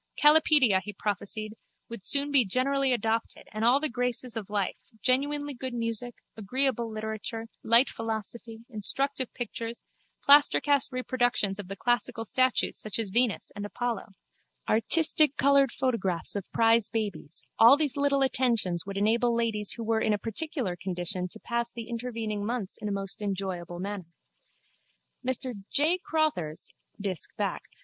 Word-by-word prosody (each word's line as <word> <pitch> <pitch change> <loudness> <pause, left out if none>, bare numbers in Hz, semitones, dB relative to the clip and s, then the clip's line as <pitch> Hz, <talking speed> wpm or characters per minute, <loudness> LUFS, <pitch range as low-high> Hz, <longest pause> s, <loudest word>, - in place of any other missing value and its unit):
Kalipedia, 295 - +5
he 210 +2 -7
prophesied, 210 +2 -3 0.3
would 230 -4 -8
soon 285 +4 +1
be 275 -3 +5
generally 265 +5 +1
adopted 225 -1 -1
and 215 +1 -4
all 245 +4 +5
the 310 - +1
graces 245 -1 -2
of 215 -3 -5
life, 205 -2 -1 0.2
genuinely 285 +4 0
good 255 0 -5
music, 230 +1 -1 0.2
agreeable 235 +2 0
literature, 220 +1 -5 0.2
light 235 +4 +5
philosophy, 225 +1 -5
instructive 260 +4 -1
pictures, 235 -1 -5 0.4
plastercast 285 -1 +5
reproductions 245 -5 0
of 200 - -6
the 195 - -6
classical 240 0 -1
statues 255 0 +1
such 215 -3 0
as 220 -4 -2
Venus 235 0 +1
and 205 - -5
Apollo, 230 -1 -4 0.5
artistic 305 +5 +3
coloured 280 -2 +4
photographs 195 -11 0
of 200 -2 -5
prize 230 -1 +4
babies, 210 -8 -4 0.2
all 235 +5 +8
these 295 -4 0
little 280 -1 +2
attentions 230 -10 0
would 195 0 -5
enable 230 +3 +2
ladies 220 -3 -1
who 230 - -6
were 220 0 0
in 215 - +2
a - - +1
particular 230 - -3
condition 180 0 -3
to - - -12
pass 235 0 -2
the 230 -1 -8
intervening 230 -3 -4
months 225 -3 -3
in 210 - -3
a - - -2
most 195 +1 -4
enjoyable 190 -4 -4
manner. 185 -3 -6 1.1
Mr 250 -4 -2
J. 315 +6 +2
Crotthers 240 - -1 0.3
(Disc. 190 -6 -3
Bacc.) - - -1
230 Hz, 145 wpm, -28 LUFS, 205-260 Hz, 1.1 s, all